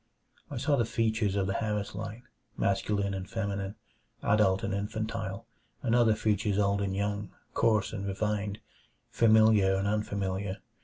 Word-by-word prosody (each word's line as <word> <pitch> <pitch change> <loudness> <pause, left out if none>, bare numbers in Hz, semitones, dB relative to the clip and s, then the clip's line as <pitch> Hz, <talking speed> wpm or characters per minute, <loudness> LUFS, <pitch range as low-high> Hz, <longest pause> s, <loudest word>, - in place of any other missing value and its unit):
I 140 - -5
saw 140 +3 +2
the 120 - +3
features 110 -2 0
of 100 -1 +1
the 95 - -1
Harris 105 -1 -2
line, 110 +3 -6 0.3
masculine 100 0 0
and 95 0 -5
feminine, 100 -2 -3 0.5
adult 100 -2 +3
and 100 - -1
infantile, 105 -1 -3 0.4
and 115 - +1
other 120 -3 +5
features 105 -2 +1
old 100 0 +2
and 95 -1 -1
young, 100 0 -2 0.2
coarse 110 -3 +2
and 100 -2 -4
refined, 105 0 -2 0.5
familiar 110 -4 +5
and 95 +1 0
unfamiliar. 100 -2 -1
105 Hz, 145 wpm, -30 LUFS, 100-110 Hz, 0.5 s, other